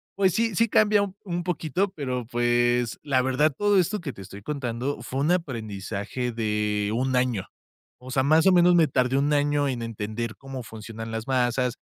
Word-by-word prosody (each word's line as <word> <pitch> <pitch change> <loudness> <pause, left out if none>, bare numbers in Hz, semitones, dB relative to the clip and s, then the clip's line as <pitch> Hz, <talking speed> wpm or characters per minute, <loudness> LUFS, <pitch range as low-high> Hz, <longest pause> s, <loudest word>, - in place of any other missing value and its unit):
pues 190 -2 +2
sí 225 -3 0
sí 230 +4 +3
cambia 210 -1 +4
u 195 -2 -5
un 175 -3 -3
poquito, 180 +2 -1
pero, 125 -5 -3
pues, 120 0 +1
la 135 -3 +2
verdad, 130 +4 +2
todo 205 -2 +3
esto 210 +4 0
que 145 -6 -6
te 100 - -11
estoy 100 +2 -10
contando 130 +1 -3
fue 135 - -4
un 155 +4 +2
aprendizaje 115 - -3
de 105 -2 -1
1, 130 +1 0
año. 125 -6 +1 0.6
O 130 - -9
sea, 130 -1 +2
más 155 +5 +4
o 190 - +7
menos 175 0 +5
me 165 -2 +5
tardé 130 0 +1
1, 145 +2 +1
año 145 0 +2
en 120 -3 -3
entender 110 +1 -4
cómo 135 -2 -7
funcionan 110 0 -8
las 110 +1 -4
masas, 125 -1 +1
130 Hz, 190 wpm, -25 LUFS, 115-155 Hz, 0.6 s, o